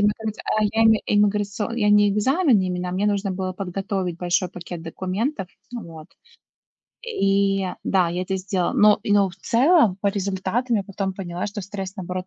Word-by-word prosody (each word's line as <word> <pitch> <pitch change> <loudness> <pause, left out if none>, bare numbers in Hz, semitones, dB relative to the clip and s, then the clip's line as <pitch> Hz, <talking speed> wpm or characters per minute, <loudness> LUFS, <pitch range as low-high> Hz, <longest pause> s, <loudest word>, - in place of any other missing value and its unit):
иммиграц 210 +1 0
а, 215 - +1
я 225 0 +2
не 220 -1 +4
имиграцион 205 +2 0
я 210 -3 +2
не 205 0 +5
экзамен 260 - +3
именно, 180 -1 -2
а 180 - -4
мне 200 +3 0
нужно 200 -1 0
было 185 0 -3
подготовить 190 -1 -3
большой 175 +1 0
пакет 175 -1 -8
документов, 190 - -3 0.2
ну 240 -2 -6
вот. 160 -2 -11 1.0
И 195 - +1 0.2
да, 185 -3 +2
я 175 +2 -2
это 190 +1 -2
сделала, 185 -1 -1
но, 210 0 +5
и 205 - +1
но, 200 -2 +4
в 180 - -13
целом, 245 - +3
по 200 - +2
результатам 200 +5 -1
я 205 - +1
потом 195 0 -4
поняла, 180 -1 -4
что 205 0 -5
стресс, 195 0 -6
наоборот, 185 -1 -5
195 Hz, 180 wpm, -23 LUFS, 185-210 Hz, 1.0 s, не